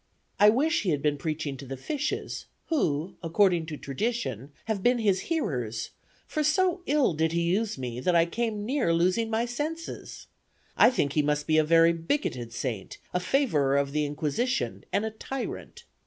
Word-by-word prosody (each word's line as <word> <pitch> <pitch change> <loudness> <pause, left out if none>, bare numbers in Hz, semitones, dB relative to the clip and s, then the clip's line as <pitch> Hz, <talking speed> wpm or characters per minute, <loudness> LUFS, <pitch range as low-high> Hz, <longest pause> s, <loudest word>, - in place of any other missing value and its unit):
I 210 - +8
wish 300 +9 +2
he 195 - -1
had 145 -4 0
been 145 -1 +1
preaching 150 -2 -3
to 135 - -9
the 135 +1 -5
fishes, 290 - -3 0.2
who, 170 - 0
according 175 -1 +2
to 155 -2 -5
tradition, 140 - -3
have 220 -3 -2
been 245 +4 +3
his 200 -5 +2
hearers; 125 - -2 0.3
for 305 - -2
so 360 +4 +2
ill 290 - +3
did 160 +1 0
he 170 - +1
use 200 +4 0
me, 125 -2 -4
that 175 +7 +1
I 165 0 +5
came 215 +3 -2
near 245 -9 +1
losing 185 +7 +2
my 225 +1 +1
senses. 305 +7 -5 0.5
I - - +7
think 145 - 0
he 150 - +3
must 150 0 0
be 155 0 +3
a - - +4
very 165 +2 +5
bigoted 165 - -2
saint, 115 -5 -4 0.2
a 180 - +2
favorer 160 - +2
of 140 0 0
the 150 +1 0
Inquisition, 155 - -2
and 210 - +1
a 220 - -3
tyrant. 255 +4 -6
170 Hz, 180 wpm, -27 LUFS, 145-240 Hz, 0.5 s, I